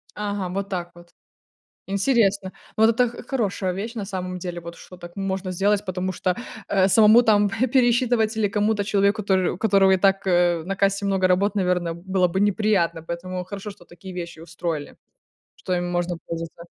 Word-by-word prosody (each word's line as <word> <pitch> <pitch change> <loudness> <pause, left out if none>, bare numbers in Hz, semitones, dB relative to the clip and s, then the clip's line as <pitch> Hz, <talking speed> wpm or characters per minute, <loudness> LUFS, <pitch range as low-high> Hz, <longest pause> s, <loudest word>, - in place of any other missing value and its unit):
Ага, 205 -3 -3
вот 195 +2 -4
так 175 -3 -4
вот. 175 0 -16 0.8
Интересно. 200 -2 +1 0.2
Вот 220 +1 +5
это 245 +2 +3
х 240 - -10
хорошая 205 -8 -1
вещь 215 +5 -5
на 210 - -3
самом 185 -2 -5
деле, 175 -1 -5
вот 170 0 -9
что 180 - -13
так 175 -1 -11
можно 190 -1 -3
сделать, 200 +3 +1
потому 185 0 -2
что, 180 0 -1 0.3
э, 190 -1 +3
самому 220 +3 +7
там 210 -3 +3
п 225 +5 0
пересчитывать 240 -3 +2
или 220 -2 +1
кому-то 210 0 0
человеку, 200 +1 +1
который 190 -2 +2
у - - -8
которого 195 -3 +4
и 190 - +4
так, 195 +1 +2
э, 175 -2 +2
на 195 - -3
кассе 200 +1 +1
много 190 -1 +2
работ, 200 +3 +1
наверное, 180 -3 0
было 185 +1 0
бы 180 +3 -2
неприятно, 200 -5 +1
поэтому 180 +2 -5
хорошо, 200 +2 -7
что 175 -3 -17
такие 180 +2 -11
вещи 170 -2 -7
устроили, 165 -2 -5 0.6
что 185 - -5
им 175 0 -2
можно 175 0 -1
пользоваться. 165 0 -6
190 Hz, 185 wpm, -23 LUFS, 180-205 Hz, 0.8 s, самому